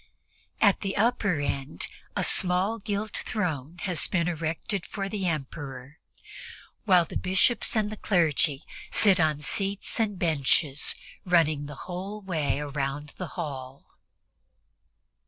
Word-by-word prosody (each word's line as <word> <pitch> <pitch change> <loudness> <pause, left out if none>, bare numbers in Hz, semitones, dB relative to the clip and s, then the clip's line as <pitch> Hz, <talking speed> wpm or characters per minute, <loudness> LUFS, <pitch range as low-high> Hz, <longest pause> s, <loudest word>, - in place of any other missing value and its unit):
At 200 -3 +4
the 195 -1 -2
upper 210 -6 +2
end 135 -9 -2 0.3
a - - 0
small 190 +5 +4
gilt 210 0 -3
throne 165 -6 -3
has 180 -5 +1
been 170 -2 0
erected 165 +3 -2
for 195 -1 -4
the 195 -2 -2
Emperor, 140 -2 -5 0.9
while 180 -4 +5
the - - -10
Bishops 190 +7 +2
and 215 -1 +1
the 215 - -6
clergy 160 -8 +2 0.3
sit 195 -4 +5
on 155 -2 +2
seats 195 - -2
and 210 -3 0
benches 150 -3 +2 0.3
running 155 -5 +2
the 145 - -8
whole 190 +4 -5
way 160 -8 -1
around 145 0 -3
the 180 - -4
hall. 135 -5 -6
175 Hz, 125 wpm, -27 LUFS, 145-195 Hz, 0.9 s, while